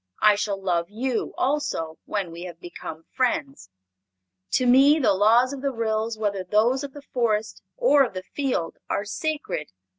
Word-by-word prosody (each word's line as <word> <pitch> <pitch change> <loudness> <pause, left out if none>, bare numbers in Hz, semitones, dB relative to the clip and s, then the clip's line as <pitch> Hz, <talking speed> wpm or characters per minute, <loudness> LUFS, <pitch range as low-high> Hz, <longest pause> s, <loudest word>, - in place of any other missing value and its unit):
I 210 -1 +8
shall 205 -1 -2
love 175 -2 0
you, 235 +3 -2
also, 255 - -1
when 200 -5 -2
we 170 +1 -9
have 170 -2 -9
become 165 -2 -8
friends. 140 - -1 0.8
To 255 - +3
me 270 +5 +6
the 260 -9 +3
laws 230 +7 +4
of 275 - -6
the 280 - 0
Ryls, 225 -2 -1
whether 200 -3 -1
those 225 +8 +2
of 280 -1 -6
the 290 - -10
Forest 220 -3 0 0.2
or 385 - +5
of 215 - -8
the 185 - -4
field, 250 - -2
are 200 - -1
sacred. 210 - -3
220 Hz, 170 wpm, -25 LUFS, 185-260 Hz, 0.8 s, I